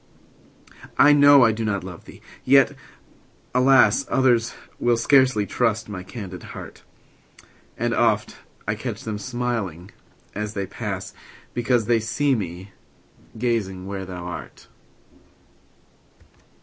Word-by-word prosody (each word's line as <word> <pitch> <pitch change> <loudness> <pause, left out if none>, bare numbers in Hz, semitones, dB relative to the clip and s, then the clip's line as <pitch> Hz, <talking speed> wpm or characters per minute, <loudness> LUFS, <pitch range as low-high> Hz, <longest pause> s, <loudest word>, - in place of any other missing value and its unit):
I 145 +1 +7
know 145 -2 +7
I 115 - +5
do 110 +1 -4
not 100 -3 -1
love 90 -2 -10
thee! - - -14 0.2
yet, 135 0 +5 0.8
alas! 135 - +5
Others 120 -3 +2 0.2
will 120 -1 +2
scarcely 130 -3 +3
trust 110 -1 0
my 95 -3 -6
candid 95 -1 -8
heart; - - -10 1.0
And 120 0 -1
oft 110 -3 +1 0.3
I 105 - +1
catch 110 0 -6
them 105 -2 -4
smiling 115 -7 -4 0.4
as 105 +1 -5
they 100 -1 -2
pass, - - -6 0.4
Because 120 -1 +1
they 120 0 +3
see 135 +6 0
me 95 -3 -5 0.7
gazing 105 -6 -2
where 95 -1 -5
thou 90 -2 -7
art. 90 - -9
110 Hz, 120 wpm, -23 LUFS, 100-125 Hz, 1.0 s, I